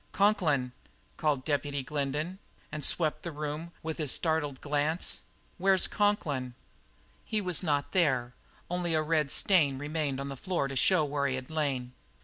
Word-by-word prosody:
"Conklin?" 165 Hz, -11 st, +2 dB, 0.4 s
called 145 Hz, -5 st, 0 dB
Deputy 145 Hz, -2 st, -1 dB
Glendin, 150 Hz, +6 st, -2 dB, 0.3 s
and 150 Hz, 0 st, -4 dB
swept 155 Hz, -3 st, +2 dB
the 170 Hz, -, -5 dB
room 150 Hz, +2 st, -4 dB
with 160 Hz, 0 st, -4 dB
his 150 Hz, -4 st, +1 dB
startled 155 Hz, -5 st, 0 dB
glance. 150 Hz, +3 st, +1 dB, 0.4 s
"Where's 190 Hz, 0 st, +4 dB
Conklin?" 145 Hz, -, 0 dB, 0.7 s
He 215 Hz, -, -1 dB
was 180 Hz, -5 st, +1 dB
not 145 Hz, -5 st, 0 dB
there; 130 Hz, -9 st, +2 dB, 0.3 s
only 175 Hz, -2 st, -1 dB
a 155 Hz, -, +3 dB
red 155 Hz, -2 st, +1 dB
stain 150 Hz, -6 st, +3 dB
remained 145 Hz, -1 st, -2 dB
on 140 Hz, 0 st, -4 dB
the 135 Hz, -, -5 dB
floor 170 Hz, -1 st, -1 dB
to 135 Hz, -, -6 dB
show 155 Hz, +4 st, +4 dB
where 140 Hz, -1 st, 0 dB
he 130 Hz, -, -1 dB
had 130 Hz, +3 st, -6 dB
lain. 135 Hz, -5 st, -1 dB
150 Hz, 155 wpm, -30 LUFS, 140-170 Hz, 0.7 s, Where's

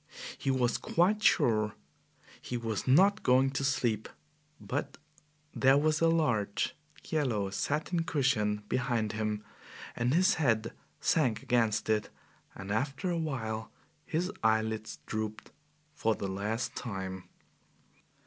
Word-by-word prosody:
He -, -, -3 dB
was 125 Hz, -2 st, +1 dB
quite 195 Hz, +5 st, +2 dB
sure 110 Hz, -, +3 dB, 0.7 s
he 125 Hz, -, -4 dB
was 115 Hz, -1 st, -3 dB
not 190 Hz, +10 st, +5 dB
going 130 Hz, +1 st, +4 dB
to 135 Hz, 0 st, -2 dB
sleep, 120 Hz, -5 st, 0 dB, 0.5 s
but -, -, -4 dB, 0.6 s
there 135 Hz, +1 st, +5 dB
was 155 Hz, +1 st, +2 dB
a 165 Hz, -, +5 dB
large, 115 Hz, -12 st, +1 dB, 0.3 s
yellow 120 Hz, -11 st, -1 dB
satin 155 Hz, -, -1 dB
cushion 125 Hz, -10 st, +1 dB
behind 120 Hz, -4 st, 0 dB
him 105 Hz, -1 st, -2 dB, 0.5 s
and 120 Hz, +2 st, 0 dB
his 185 Hz, +7 st, +4 dB
head 115 Hz, -5 st, +1 dB, 0.3 s
sank 125 Hz, -9 st, +1 dB
against 115 Hz, -3 st, +1 dB
it, 110 Hz, -1 st, +1 dB, 0.5 s
and 95 Hz, +1 st, -7 dB
after 135 Hz, -, -1 dB
a 170 Hz, -, 0 dB
while 110 Hz, -8 st, -3 dB, 0.3 s
his 175 Hz, +5 st, -1 dB
eyelids 110 Hz, 0 st, 0 dB
drooped 110 Hz, 0 st, -4 dB, 0.4 s
for 110 Hz, -5 st, +1 dB
the 100 Hz, -, -4 dB
last 105 Hz, +5 st, -2 dB
time. 95 Hz, -4 st, -5 dB
120 Hz, 120 wpm, -31 LUFS, 110-145 Hz, 0.7 s, not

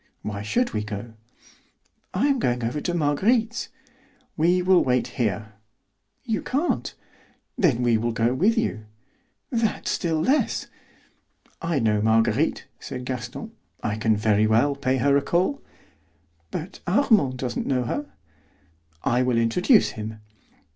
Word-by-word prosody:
"Why 105 Hz, -1 st, -4 dB
should 240 Hz, -, 0 dB
we 105 Hz, -, -1 dB
go?" 105 Hz, +2 st, -6 dB, 1.0 s
"I -, -, +1 dB
am 275 Hz, -2 st, +2 dB
going 125 Hz, -, 0 dB
over 125 Hz, +6 st, -2 dB
to 175 Hz, -, -2 dB
Marguerite's." 220 Hz, -, +1 dB, 0.7 s
"We 175 Hz, +3 st, +2 dB
will 185 Hz, -1 st, +5 dB
wait 125 Hz, -1 st, +1 dB
here." 110 Hz, -2 st, -2 dB, 0.7 s
"You 225 Hz, -5 st, -1 dB
can't." 290 Hz, +7 st, -1 dB, 0.6 s
"Then 130 Hz, -, +2 dB
we 115 Hz, -2 st, +3 dB
will 120 Hz, +1 st, -1 dB
go 115 Hz, +2 st, +1 dB
with 205 Hz, -, +2 dB
you." 110 Hz, -, -1 dB, 0.6 s
"That 230 Hz, -3 st, -1 dB
still 165 Hz, -3 st, 0 dB
less." 270 Hz, -, +1 dB, 1.0 s
"I 165 Hz, -2 st, -1 dB
know 110 Hz, -4 st, +2 dB
Marguerite," 110 Hz, +1 st, +2 dB
said 125 Hz, -1 st, -7 dB
Gaston; 125 Hz, -3 st, -5 dB, 0.3 s
"I 105 Hz, -, -1 dB
can 110 Hz, 0 st, +1 dB
very 105 Hz, 0 st, +3 dB
well 120 Hz, +6 st, +3 dB
pay 130 Hz, -1 st, 0 dB
her 140 Hz, +3 st, +3 dB
a -, -, +2 dB
call." 180 Hz, -, 0 dB, 0.9 s
"But -, -, -6 dB
Armand 210 Hz, -, +3 dB
doesn't 125 Hz, -2 st, -3 dB
know 130 Hz, -2 st, +1 dB
her." 290 Hz, -, -3 dB, 1.0 s
"I 125 Hz, +1 st, +2 dB
will 125 Hz, -2 st, +1 dB
introduce 180 Hz, -, +4 dB
him." 110 Hz, 0 st, -6 dB
130 Hz, 135 wpm, -24 LUFS, 115-180 Hz, 1.0 s, will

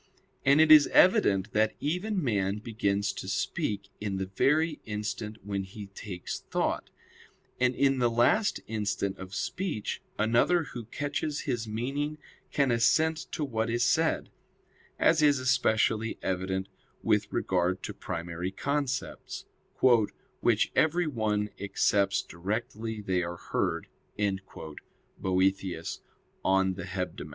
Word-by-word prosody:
And 140 Hz, +2 st, +5 dB
it 160 Hz, 0 st, +6 dB
is 150 Hz, -2 st, +9 dB
evident 110 Hz, -, +4 dB
that 110 Hz, 0 st, +2 dB
even 180 Hz, +5 st, -1 dB
man 100 Hz, -5 st, 0 dB
begins 105 Hz, -2 st, -1 dB
to -, -, -7 dB
speak 100 Hz, -, -2 dB
in 100 Hz, -2 st, -2 dB
the 95 Hz, -, -1 dB
very 150 Hz, -, +1 dB
instant 105 Hz, 0 st, -4 dB
when 100 Hz, -1 st, -2 dB
he 100 Hz, +1 st, -9 dB
takes 95 Hz, -4 st, -6 dB
thought; -, -, -2 dB, 0.7 s
and 125 Hz, 0 st, +2 dB
in 135 Hz, 0 st, +3 dB
the 120 Hz, -1 st, +3 dB
last 120 Hz, -, +2 dB
instant 100 Hz, -3 st, -2 dB
of 95 Hz, +1 st, -8 dB
speech, 175 Hz, -, -3 dB, 0.2 s
another 120 Hz, +11 st, +3 dB
who 120 Hz, -6 st, -8 dB
catches 145 Hz, +4 st, -3 dB
his 120 Hz, -5 st, -2 dB
meaning 140 Hz, +7 st, -2 dB, 0.3 s
can 140 Hz, -3 st, +2 dB
assent 155 Hz, +7 st, +2 dB
to 150 Hz, -, -1 dB
what 115 Hz, -4 st, -1 dB
is 120 Hz, +1 st, +1 dB
said; 160 Hz, +7 st, +2 dB, 0.7 s
as 160 Hz, -1 st, +4 dB
is 145 Hz, -2 st, +5 dB
especially 115 Hz, -4 st, +2 dB
evident 95 Hz, +1 st, -1 dB, 0.4 s
with -, -, +2 dB
regard 90 Hz, 0 st, 0 dB
to 105 Hz, -, -4 dB
primary 85 Hz, -1 st, -4 dB
concepts, 135 Hz, +4 st, -3 dB, 1.0 s
"which -, -, +3 dB
everyone 115 Hz, -11 st, +1 dB
accepts 100 Hz, 0 st, +2 dB
directly 110 Hz, +4 st, -4 dB
they 95 Hz, -3 st, 0 dB
are 85 Hz, 0 st, -4 dB
heard" 85 Hz, 0 st, -1 dB, 0.3 s
[*Boethius, 95 Hz, 0 st, -2 dB, 0.4 s
De 95 Hz, -1 st, +2 dB
Hebdom. 90 Hz, -4 st, -4 dB
110 Hz, 120 wpm, -29 LUFS, 95-140 Hz, 1.0 s, is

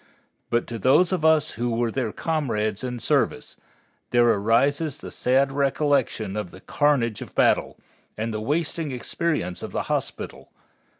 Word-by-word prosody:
But 120 Hz, 0 st, +1 dB
to 115 Hz, -1 st, -6 dB
those 150 Hz, -, +4 dB
of 180 Hz, -4 st, -1 dB
us 160 Hz, -1 st, +4 dB
who 120 Hz, 0 st, -2 dB
were 115 Hz, -1 st, 0 dB
their 120 Hz, -4 st, -2 dB
comrades 110 Hz, -10 st, -1 dB
in 125 Hz, -1 st, -3 dB
service, 115 Hz, -, 0 dB, 0.5 s
there 120 Hz, -1 st, +4 dB
arises 135 Hz, +8 st, +2 dB
the -, -, -9 dB
sad 135 Hz, +2 st, +2 dB
recollection 135 Hz, -7 st, 0 dB
of 105 Hz, -4 st, -3 dB
the 95 Hz, -, -13 dB
carnage 130 Hz, -7 st, +1 dB
of -, -, -9 dB
battle -, -, +2 dB, 0.4 s
and 110 Hz, +1 st, -2 dB
the 110 Hz, -, -3 dB
wasting 155 Hz, +3 st, -1 dB
experience 125 Hz, -, -2 dB
of -, -, -7 dB
the -, -, -1 dB
hospital. -, -, -4 dB
125 Hz, 155 wpm, -24 LUFS, 115-150 Hz, 0.5 s, those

